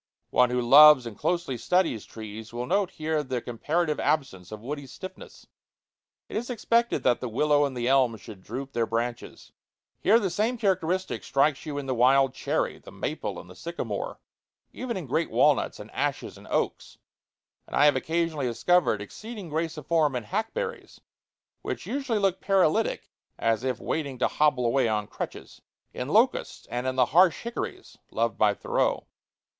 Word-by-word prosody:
One 125 Hz, -1 st, +4 dB
who 125 Hz, 0 st, 0 dB
loves 145 Hz, +1 st, +8 dB
and 115 Hz, -3 st, -7 dB
closely 170 Hz, -, -1 dB
studies 160 Hz, -, +1 dB
trees 110 Hz, 0 st, -9 dB
will 120 Hz, +1 st, -4 dB
note 195 Hz, +7 st, +1 dB
here 155 Hz, 0 st, -2 dB
the 130 Hz, -3 st, -3 dB
comparative 150 Hz, +7 st, -1 dB
absence 95 Hz, -, -1 dB
of 110 Hz, -, -7 dB
woody 145 Hz, +2 st, -5 dB
stiffness. 185 Hz, +10 st, -11 dB, 0.8 s
It -, -, -9 dB
is 240 Hz, +3 st, -3 dB
expected 235 Hz, 0 st, +1 dB
that 120 Hz, -2 st, +3 dB
the 125 Hz, -, -3 dB
willow 145 Hz, +5 st, +3 dB
and 135 Hz, -3 st, -4 dB
the 120 Hz, 0 st, -1 dB
elm 130 Hz, -4 st, +3 dB
should 105 Hz, -2 st, -12 dB
droop 130 Hz, +7 st, -6 dB
their 115 Hz, -1 st, 0 dB
branches. 115 Hz, +1 st, -4 dB, 0.5 s
Here 220 Hz, +4 st, +5 dB
the 195 Hz, -5 st, -1 dB
same 220 Hz, +7 st, 0 dB
characteristic 185 Hz, -3 st, 0 dB
strikes 145 Hz, +2 st, +1 dB
you 145 Hz, -1 st, -4 dB
in 145 Hz, -, -4 dB
the 130 Hz, -, -1 dB
wild 130 Hz, +2 st, +4 dB
cherry, -, -, -2 dB
the -, -, -13 dB
maple, -, -, -4 dB
and -, -, -12 dB
the -, -, -13 dB
sycamore -, -, -5 dB, 0.5 s
even 245 Hz, -4 st, -4 dB
in 180 Hz, -, -5 dB
great 160 Hz, +6 st, 0 dB
walnuts -, -, +2 dB
and -, -, -10 dB
ashes -, -, -2 dB
and -, -, -14 dB
oaks; -, -, -2 dB, 0.7 s
and -, -, -6 dB
I 145 Hz, -, +5 dB
have 145 Hz, -, +5 dB
occasionally 160 Hz, -4 st, -1 dB
discovered 120 Hz, -, +2 dB
exceeding 210 Hz, -, -9 dB
grace 160 Hz, +1 st, -2 dB
of 150 Hz, -, -8 dB
form 155 Hz, -5 st, +2 dB
in 125 Hz, -, -2 dB
hackberries 340 Hz, -, -4 dB, 0.6 s
(which -, -, -5 dB
usually 270 Hz, -5 st, -1 dB
look 195 Hz, -2 st, +1 dB
paralytic 195 Hz, +2 st, +1 dB, 0.3 s
and 115 Hz, -, +2 dB
as 115 Hz, +2 st, -1 dB
if 130 Hz, -1 st, -1 dB
waiting 140 Hz, -5 st, -3 dB
to 125 Hz, -, +2 dB
hobble 145 Hz, -5 st, +2 dB
away 125 Hz, +1 st, +2 dB
on 105 Hz, -1 st, 0 dB
crutches), -, -, -8 dB, 0.3 s
in -, -, -4 dB
locusts, -, -, +1 dB
and 125 Hz, +1 st, -2 dB
in 130 Hz, -, -1 dB
the 130 Hz, -1 st, +4 dB
harsh 180 Hz, 0 st, +5 dB
hickories 235 Hz, +1 st, -6 dB
loved -, -, -1 dB
by -, -, +4 dB
Thoreau. -, -, 0 dB
145 Hz, 175 wpm, -27 LUFS, 125-185 Hz, 0.8 s, loves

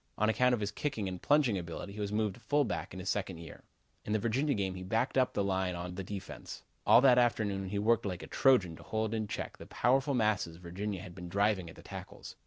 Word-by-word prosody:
On 110 Hz, +1 st, +2 dB
account 125 Hz, +2 st, +4 dB
of 110 Hz, -, -6 dB
his 105 Hz, 0 st, -1 dB
kicking 115 Hz, -4 st, -2 dB
and 90 Hz, -1 st, -5 dB
plunging 140 Hz, -9 st, +3 dB
ability 85 Hz, +3 st, -6 dB
he 105 Hz, -, -8 dB
was 100 Hz, -1 st, -2 dB
moved 105 Hz, -1 st, 0 dB
to -, -, -15 dB
fullback 145 Hz, -5 st, 0 dB
in 95 Hz, -, -7 dB
his 95 Hz, -, -6 dB
second 95 Hz, -3 st, -1 dB
year. 85 Hz, 0 st, -10 dB, 0.4 s
In 105 Hz, -, -2 dB
the -, -, +4 dB
Virginia 125 Hz, +7 st, +1 dB
game 95 Hz, -2 st, -1 dB
he 95 Hz, -, -7 dB
backed 110 Hz, +7 st, 0 dB
up 130 Hz, -1 st, +3 dB
the 100 Hz, -, +2 dB
line 95 Hz, -2 st, 0 dB
on 90 Hz, +1 st, -5 dB
the 95 Hz, +2 st, -5 dB
defense. 95 Hz, 0 st, -7 dB, 0.2 s
All -, -, +8 dB
that 130 Hz, -2 st, +6 dB
afternoon 100 Hz, -5 st, +1 dB
he 100 Hz, -, -2 dB
worked 110 Hz, +1 st, +2 dB
like 90 Hz, -1 st, -4 dB
a -, -, -8 dB
Trojan 110 Hz, -11 st, +3 dB
to -, -, -13 dB
hold 110 Hz, 0 st, -2 dB
in 110 Hz, -1 st, -1 dB
check -, -, -5 dB
the -, -, -11 dB
powerful 135 Hz, +3 st, +2 dB
masses 105 Hz, -8 st, +1 dB
Virginia 90 Hz, +2 st, -5 dB
had 90 Hz, -, -9 dB
been 90 Hz, -1 st, -8 dB
driving 100 Hz, -2 st, +1 dB
at -, -, -12 dB
the -, -, -14 dB
tackles. -, -, -9 dB
105 Hz, 245 wpm, -32 LUFS, 95-115 Hz, 0.4 s, All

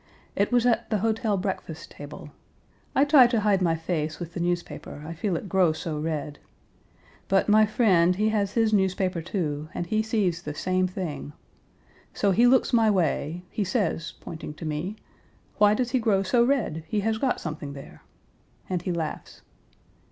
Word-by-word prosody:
It 200 Hz, +3 st, +1 dB
was 245 Hz, -1 st, +3 dB
at 240 Hz, -2 st, +1 dB
the 215 Hz, -, +1 dB
hotel 220 Hz, 0 st, 0 dB
breakfast 185 Hz, -4 st, -5 dB
table. 145 Hz, 0 st, -10 dB, 0.6 s
I 275 Hz, -, +5 dB
try 285 Hz, -4 st, +7 dB
to 235 Hz, -3 st, 0 dB
hide 200 Hz, -2 st, +2 dB
my 165 Hz, -2 st, +2 dB
face 160 Hz, -2 st, -3 dB
with 175 Hz, -1 st, -7 dB
the 175 Hz, -, -5 dB
newspaper, 175 Hz, -4 st, -3 dB
I 165 Hz, -, -5 dB
feel 175 Hz, +3 st, -2 dB
it 180 Hz, -, -4 dB
grow 185 Hz, -3 st, +3 dB
so 155 Hz, -1 st, -4 dB
red. 150 Hz, -2 st, -3 dB, 0.9 s
But 195 Hz, 0 st, +2 dB
my 215 Hz, +1 st, +5 dB
friend 185 Hz, -6 st, +3 dB
he 215 Hz, +3 st, +1 dB
has 205 Hz, -2 st, 0 dB
his 225 Hz, -2 st, +2 dB
newspaper, 185 Hz, -3 st, +1 dB
too, 155 Hz, -4 st, -3 dB
and 175 Hz, -, -2 dB
he 215 Hz, +5 st, +1 dB
sees 205 Hz, -6 st, 0 dB
the 150 Hz, -3 st, -6 dB
same 185 Hz, +3 st, 0 dB
thing. 175 Hz, -5 st, -5 dB, 0.8 s
So 200 Hz, -, +2 dB
he 235 Hz, +6 st, +5 dB
looks 260 Hz, 0 st, +3 dB
my 225 Hz, -2 st, +5 dB
way 175 Hz, -3 st, 0 dB
he 210 Hz, -, -1 dB
says, 180 Hz, -4 st, -1 dB
pointing 160 Hz, -2 st, -8 dB
to 160 Hz, -, -8 dB
me 155 Hz, +7 st, -3 dB, 0.6 s
'Why 210 Hz, 0 st, +6 dB
does 245 Hz, +1 st, -1 dB
he 260 Hz, -, +2 dB
grow 210 Hz, -4 st, +2 dB
so 235 Hz, +5 st, +3 dB
red? 240 Hz, -, 0 dB
He 210 Hz, -2 st, -1 dB
has 220 Hz, +1 st, 0 dB
got 260 Hz, 0 st, 0 dB
something 150 Hz, -3 st, -6 dB
there!' 140 Hz, -1 st, -11 dB, 0.7 s
and 180 Hz, -2 st, -2 dB
he 180 Hz, -, -3 dB
laughs. 165 Hz, -3 st, -5 dB
185 Hz, 180 wpm, -26 LUFS, 165-215 Hz, 0.9 s, try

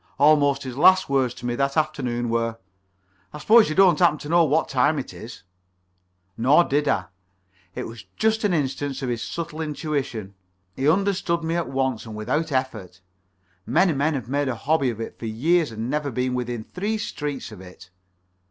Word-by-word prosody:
Almost 145 Hz, -1 st, +4 dB
his 130 Hz, -2 st, -6 dB
last 185 Hz, +1 st, +5 dB
words 130 Hz, -3 st, +1 dB
to -, -, -10 dB
me 120 Hz, -, -1 dB
that 140 Hz, +3 st, -1 dB
afternoon 125 Hz, -6 st, -1 dB
were: 115 Hz, 0 st, -1 dB, 0.8 s
"I -, -, -6 dB
suppose 220 Hz, +7 st, +5 dB
you 155 Hz, -, -3 dB
don't 185 Hz, -5 st, +5 dB
happen 170 Hz, -4 st, +4 dB
to 145 Hz, 0 st, -9 dB
know 170 Hz, +1 st, +5 dB
what 155 Hz, +1 st, +1 dB
the -, -, -9 dB
time 140 Hz, +4 st, +3 dB
is?" 115 Hz, -6 st, -8 dB, 0.9 s
Nor 140 Hz, +9 st, +4 dB
did 145 Hz, -1 st, 0 dB
I. 95 Hz, -, +1 dB, 0.7 s
It -, -, -4 dB
was 115 Hz, -5 st, -10 dB
just 220 Hz, 0 st, +1 dB
an 205 Hz, -, +2 dB
instance 140 Hz, -3 st, -2 dB
of 130 Hz, -, -2 dB
his 120 Hz, -2 st, -2 dB
subtle 160 Hz, +2 st, -5 dB
intuition. 140 Hz, -9 st, -3 dB, 0.4 s
He 135 Hz, +3 st, +1 dB
understood 185 Hz, -2 st, +1 dB
me 165 Hz, +1 st, -1 dB
at 170 Hz, -, -2 dB
once 130 Hz, -4 st, -2 dB
and 110 Hz, -, -8 dB
without 150 Hz, +9 st, -2 dB
effort. 110 Hz, -9 st, -3 dB, 0.7 s
Many 175 Hz, +1 st, +3 dB
men 145 Hz, +3 st, 0 dB
have 130 Hz, -4 st, -5 dB
made 140 Hz, +2 st, -1 dB
a 130 Hz, -, -1 dB
hobby 140 Hz, +1 st, +1 dB
of 115 Hz, -2 st, -5 dB
it 115 Hz, -, -7 dB
for 115 Hz, -, -5 dB
years 150 Hz, +7 st, +1 dB
and 110 Hz, +1 st, -5 dB
never 145 Hz, +1 st, -1 dB
been 125 Hz, 0 st, -2 dB
within 120 Hz, -2 st, -3 dB
three 205 Hz, -, -3 dB
streets 145 Hz, -, -5 dB
of 100 Hz, -4 st, -11 dB
it. 90 Hz, 0 st, -14 dB
140 Hz, 190 wpm, -23 LUFS, 120-160 Hz, 0.9 s, last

